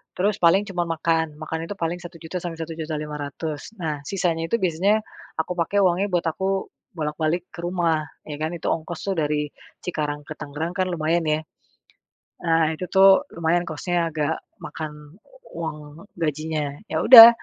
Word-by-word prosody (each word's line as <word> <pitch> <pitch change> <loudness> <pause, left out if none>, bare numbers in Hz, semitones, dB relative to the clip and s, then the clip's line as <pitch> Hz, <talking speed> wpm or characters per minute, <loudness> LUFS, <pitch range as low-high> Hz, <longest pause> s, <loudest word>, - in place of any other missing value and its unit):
terus 200 +3 +1
paling 175 +3 +5
cuma 175 -2 0
makan, 165 -1 0
makan 160 +1 -3
itu 205 - -4
paling 170 -2 -2
1.000.000 175 0 -7
sampai 175 -1 -5
1.500.000 155 0 -5
nah 160 -7 -3
sisanya 170 -4 0
itu 230 - +1
biasanya 190 +5 +3 0.3
aku 160 +2 -2
pake 200 +4 +2
uangnya 185 +2 +3
buat 175 -3 0
aku 190 +3 -1 0.3
bolak-balik 160 +2 -1
ke 200 - -11
rumah 170 -3 +1 0.2
ya 150 -1 -6
kan 155 +2 -2
itu 170 - -3
ongkos 165 +1 -3
itu - - +2
dari 150 -1 +1 0.4
Cikarang 150 -4 -2
ke 150 +1 -9
Tangerang 150 +4 -4
kan 185 - +2
lumayan 165 +1 +1
ya. 155 0 +2 1.0
Ah 165 -2 +3
itu 180 +3 -6
tuh 195 +3 +7
lumayan 170 +1 +1
cost-nya 170 +2 -1
agak 155 0 -1 0.2
makan 150 0 -8 0.4
uang 155 +2 -7
gajinya, 155 -2 -2 0.2
ya - - 0
udah. 230 -2 +13
165 Hz, 155 wpm, -24 LUFS, 155-175 Hz, 1.0 s, udah